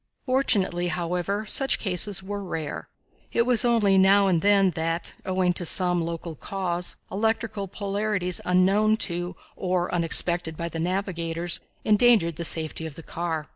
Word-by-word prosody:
Fortunately, 200 Hz, -10 st, +1 dB
however, 175 Hz, +5 st, -2 dB
such 270 Hz, +5 st, +3 dB
cases 190 Hz, 0 st, -2 dB
were 200 Hz, +1 st, -5 dB
rare. 160 Hz, -5 st, -6 dB, 0.4 s
It 235 Hz, -, +2 dB
was 245 Hz, -3 st, +6 dB
only 215 Hz, -5 st, +3 dB
now 195 Hz, +1 st, +5 dB
and 180 Hz, -4 st, +1 dB
then 200 Hz, -1 st, +3 dB
that, 165 Hz, +1 st, -3 dB
owing 185 Hz, -1 st, +1 dB
to 175 Hz, -, 0 dB
some 175 Hz, 0 st, +3 dB
local 165 Hz, 0 st, -5 dB
cause, 180 Hz, 0 st, -2 dB, 0.2 s
electrical 220 Hz, -1 st, -2 dB
polarities 200 Hz, -2 st, -3 dB
unknown 195 Hz, +4 st, +2 dB
to 175 Hz, +1 st, -4 dB, 0.2 s
or 180 Hz, -1 st, -2 dB
unexpected 170 Hz, -1 st, +1 dB
by 170 Hz, 0 st, -4 dB
the 165 Hz, -, -6 dB
navigators, 170 Hz, -2 st, -1 dB, 0.3 s
endangered 210 Hz, -7 st, +3 dB
the 170 Hz, -, -4 dB
safety 160 Hz, 0 st, -3 dB
of 150 Hz, -, -10 dB
the 165 Hz, -, -10 dB
car. 160 Hz, -2 st, -4 dB
180 Hz, 145 wpm, -25 LUFS, 170-200 Hz, 0.4 s, was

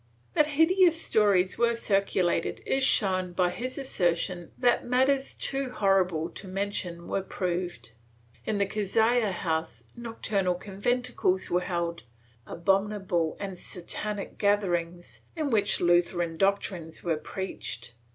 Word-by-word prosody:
That 300 Hz, -, +4 dB
hideous 340 Hz, 0 st, +5 dB
stories 200 Hz, -, +2 dB
were 235 Hz, 0 st, +3 dB
circulated 195 Hz, -5 st, 0 dB
is 270 Hz, 0 st, +1 dB
shown 185 Hz, -6 st, +2 dB
by 180 Hz, 0 st, +2 dB
his 255 Hz, +6 st, -5 dB
assertion 175 Hz, -8 st, -1 dB
that 245 Hz, -1 st, +3 dB
matters 265 Hz, +2 st, +1 dB
too 270 Hz, -1 st, -2 dB
horrible 185 Hz, -7 st, +1 dB
to 195 Hz, -, -9 dB
mention 185 Hz, -3 st, -3 dB
were 195 Hz, -, -1 dB
proved; 180 Hz, -, -3 dB, 0.5 s
in 215 Hz, -, -1 dB
the 200 Hz, -, +2 dB
Cazalla 220 Hz, +2 st, +2 dB
house 160 Hz, -, -2 dB
nocturnal 210 Hz, -6 st, -1 dB
conventicles 205 Hz, 0 st, -1 dB
were 175 Hz, +1 st, +3 dB
held, 170 Hz, -2 st, -2 dB, 0.5 s
abominable 190 Hz, -2 st, 0 dB
and 195 Hz, -2 st, -4 dB
Satanic 200 Hz, +3 st, -6 dB
gatherings, 175 Hz, -4 st, 0 dB
in 305 Hz, -4 st, -1 dB
which 215 Hz, -3 st, +2 dB
Lutheran 175 Hz, -1 st, +2 dB
doctrines 185 Hz, -3 st, -1 dB
were 165 Hz, -3 st, 0 dB
preached. 150 Hz, -, -6 dB
195 Hz, 120 wpm, -28 LUFS, 175-220 Hz, 0.5 s, hideous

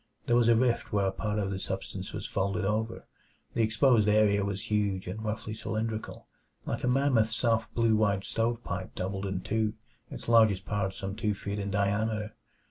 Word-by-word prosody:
There 120 Hz, -, +2 dB
was 120 Hz, -1 st, +4 dB
a 115 Hz, -, +6 dB
rift 120 Hz, 0 st, +1 dB
where 100 Hz, -1 st, +2 dB
a 95 Hz, -, +1 dB
part 105 Hz, +2 st, -2 dB
of 100 Hz, -2 st, -1 dB
the 95 Hz, -, -3 dB
substance -, -, -5 dB
was -, -, -5 dB
folded 100 Hz, +1 st, -1 dB
over. 110 Hz, +3 st, -1 dB, 0.5 s
The 115 Hz, -, +1 dB
exposed 110 Hz, 0 st, +4 dB
area 105 Hz, -1 st, +4 dB
was 100 Hz, +1 st, -4 dB
huge 100 Hz, -3 st, +1 dB
and 105 Hz, +5 st, -5 dB
roughly 110 Hz, 0 st, -3 dB
cylindrical; 110 Hz, 0 st, -4 dB, 0.4 s
like -, -, -3 dB
a -, -, +1 dB
mammoth 125 Hz, -4 st, +3 dB
soft 115 Hz, 0 st, +1 dB
blue 115 Hz, -1 st, +3 dB
white 100 Hz, -2 st, +2 dB
stovepipe 115 Hz, -5 st, -2 dB
doubled 95 Hz, +1 st, -3 dB
in 95 Hz, -1 st, -2 dB
two, 110 Hz, +1 st, -1 dB, 0.3 s
its -, -, -8 dB
largest 110 Hz, -5 st, +5 dB
part 100 Hz, -2 st, -1 dB
some 95 Hz, 0 st, -5 dB
two 105 Hz, -1 st, -1 dB
feet 100 Hz, +1 st, -4 dB
in 100 Hz, 0 st, -3 dB
diameter. 105 Hz, +2 st, 0 dB
105 Hz, 185 wpm, -29 LUFS, 100-115 Hz, 0.5 s, a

